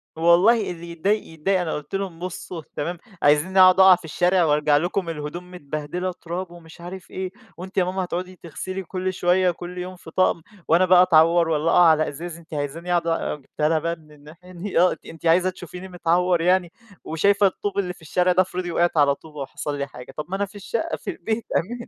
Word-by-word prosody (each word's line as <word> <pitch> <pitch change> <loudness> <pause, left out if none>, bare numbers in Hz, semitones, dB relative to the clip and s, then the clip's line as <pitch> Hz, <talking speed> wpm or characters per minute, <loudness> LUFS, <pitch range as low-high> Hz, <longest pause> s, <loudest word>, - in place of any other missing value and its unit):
والله 180 +7 +4
اللي 170 0 -8
يتضايق 200 +6 0
يتضايق، 170 +4 0
أنا 165 -3 -2
قُلت 150 +4 -5
لهم: 190 -4 -4
"بصوا 180 -1 -6
تمام، 170 +4 -3 0.2
عايزينّي 150 +6 +3
أقعد 185 0 +7
أقع 190 -1 +9
في 175 - -12
الشارع 180 +3 +2
وأرجع 150 -1 +3
لكم 175 +3 -1
الهدوم 165 +3 -6
متبهدلة 155 +2 -4
تراب 175 +1 -5
ومش 170 -1 -14
عارف 180 +1 -9
إيه، 185 -1 -4 0.3
وأنتِ 185 +3 -9
يا 185 - +5
ماما 185 +1 -2
هتقعدي 180 +1 -5
تغسلي 185 +3 -6
كل 185 +1 -3
شوية، 180 0 +2
كل 175 +1 -9
يوم 180 +1 -5
في 170 -2 -13
طقم، 185 -2 +2 0.3
وأنا 170 +3 +4
بقى 180 0 +6
أتعور 165 -1 +4
والّا 160 +1 +1
أقع 175 - +6
على 155 -1 +4
إزاز، 165 +3 -7
أنتِ 170 -1 -15
عايزاني 150 +4 -4
أقعد 170 - -3
آآ،" 165 0 -1
وجِبتها 150 +1 -2
لها 160 -1 +2
بقى 170 +2 -2
من 155 -2 -21
الناحية 150 +5 -15
دي، 185 +1 -2
آه، 180 +1 +5
أنتِ - - -8
أنتِ 165 +1 -11
عايزة 175 +3 +4
تشوفيني 180 0 -9
متعور 175 0 +1
يعني، 180 0 +2 0.3
وشايفة 200 +5 +3
الطوب 200 +1 -4
اللي 180 -2 -2
في 175 - -21
الشارع 180 +3 +1
ده، 185 - +4
افرضي 180 -1 -3
وقعت 170 0 +1
على 140 -1 +4
طوبة 150 0 -13
وحصل 145 +1 -5
لي 140 0 -3
حاجة، 125 0 -12
طَب 150 - -3
ما 190 - -2
أنا 200 +1 0
في 200 - -18
الشقة، 205 - -3
في - - -8
البيت 230 - -3
أمان 235 +6 -4
175 Hz, 215 wpm, -23 LUFS, 160-185 Hz, 0.3 s, أقع